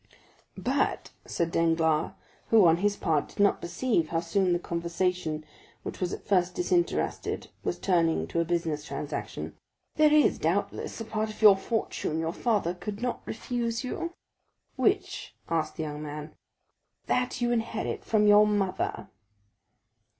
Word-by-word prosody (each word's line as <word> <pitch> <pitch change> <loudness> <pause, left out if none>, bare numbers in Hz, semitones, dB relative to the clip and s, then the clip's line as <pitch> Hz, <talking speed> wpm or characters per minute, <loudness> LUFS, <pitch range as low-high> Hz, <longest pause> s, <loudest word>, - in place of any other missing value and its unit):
"But," - - 0 0.2
said 170 -1 -1
Danglars, 165 -2 +2 0.3
who, 220 -4 +6
on 165 0 +6
his 205 +2 +1
part, 160 -5 +1
did - - -16
not 200 0 +4
perceive 175 -1 0
how 165 - +1
soon 180 +2 +1
the 175 - +3
conversation, 170 -2 -2 0.4
which - - -6
was 180 -1 0
at - - -6
first 180 -3 +2
disinterested, 355 -1 0
was - - -1
turning 170 -4 +2
to 170 - -1
a - - +3
business 165 -3 -1
transaction, - - -5 0.4
"there 305 -1 +6
is, 300 -1 +4
doubtless, - - -1
a - - -4
part 215 0 -2
of 215 +1 -8
your 205 -2 +10
fortune 195 -6 -2
your 160 +1 -1
father 205 -7 0
could 205 +3 -6
not 245 - -2
refuse 235 +1 -2
you?" 335 +7 -4 0.6
"Which?" - - 0
asked 165 -1 -1
the 160 - -2
young 150 -1 -5
man. 150 0 -6 0.7
"That 250 -1 0
you 240 -1 +1
inherit 225 -1 -2
from 215 -1 +2
your 210 0 +7
mother." 200 -3 -1
185 Hz, 150 wpm, -28 LUFS, 165-225 Hz, 0.7 s, your